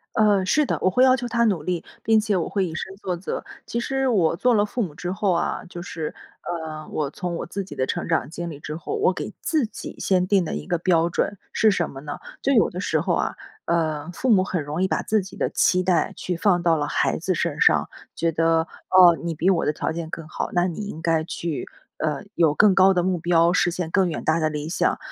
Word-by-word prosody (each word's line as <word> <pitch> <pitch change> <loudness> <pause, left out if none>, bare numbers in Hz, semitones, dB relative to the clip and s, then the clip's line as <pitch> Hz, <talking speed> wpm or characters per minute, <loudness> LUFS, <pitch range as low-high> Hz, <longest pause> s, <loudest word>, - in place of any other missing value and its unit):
呃， 205 -3 +4
是 300 +10 +2
的， - - -1
我 185 - +3
会 250 +7 +3
要 260 0 +6
求 245 -1 -4
他 235 0 +1
努 195 -9 +1
力 175 0 -2 0.2
并 220 0 +4
且 210 -2 0
我 170 - -1
会 195 -2 0
以 160 - -6
身 190 - -5
作 185 -3 -3
则。 175 - -5 0.2
其 235 - -3
实 270 +2 0
我 180 -9 +2
做 250 +7 +3
了 205 -3 +3
父 240 +3 -2
母 170 -8 -4
之 175 - -5
后 190 +1 0
啊， 170 - -1
就 175 - -7
是， 160 -3 -5 0.3
呃， 160 -3 -5
我 145 -3 -2
从 180 -3 -4
我 - - -4
自 195 +3 -4
己 190 - -10
的 130 - -1
成 - - -3
长 - - +1
经 170 +2 -5
历 145 -2 -9
之 150 0 -6
后， 170 - -5
我 440 +2 +3
给 - - -5
自 310 -5 +1
己 215 - -9
先 185 -2 +1
定 190 -1 +3
的 155 - -4
一 - - -5
个 175 -1 0
标 170 -1 +2
准， 200 +3 -1 0.2
是 220 - +4
什 175 -5 0
么 135 - -9
呢？ 145 0 -6 0.2
就 275 - +2
有 230 -5 +4
的 180 - -7
时 160 -4 0
候 175 +1 0
啊， - - -1 0.3
呃， 160 -2 -1
父 260 - -3
母 190 -4 +5
很 175 -5 -2
容 150 +5 -3
易 - - +3
把 - - 0
自 215 -1 +1
己 190 - -11
的 - - +1
期 180 0 +2
待 180 -2 +1
去 180 - -3
放 175 -1 +2
到 170 -2 +3
了 145 -1 -1
孩 - - 0
子 - - -1
身 - - -2
上， - - +4 0.3
觉 165 0 0
得， 165 0 +2 0.2
哦， 180 -2 +7
你 170 -1 -2
比 165 +4 0
我 185 -4 +3
的 - - +1
条 155 - -2
件 165 -1 -5
更 165 -2 -7
好， - - -4
那 175 0 +2
你 180 +2 -4
应 160 - -7
该 165 -1 +1
去， 165 -1 -4 0.3
呃， 150 -2 -2
有 160 -3 +3
更 205 +3 +5
高 190 0 +6
的 180 -2 +1
目 180 -1 0
标 170 +1 +3
实 175 - +3
现 175 -1 -4
更 185 0 +2
远 160 - -4
大 160 +1 +2
的 155 -1 +1
理 150 0 -4
想。 170 - 0
175 Hz, 275 characters per minute, -23 LUFS, 165-195 Hz, 0.3 s, 哦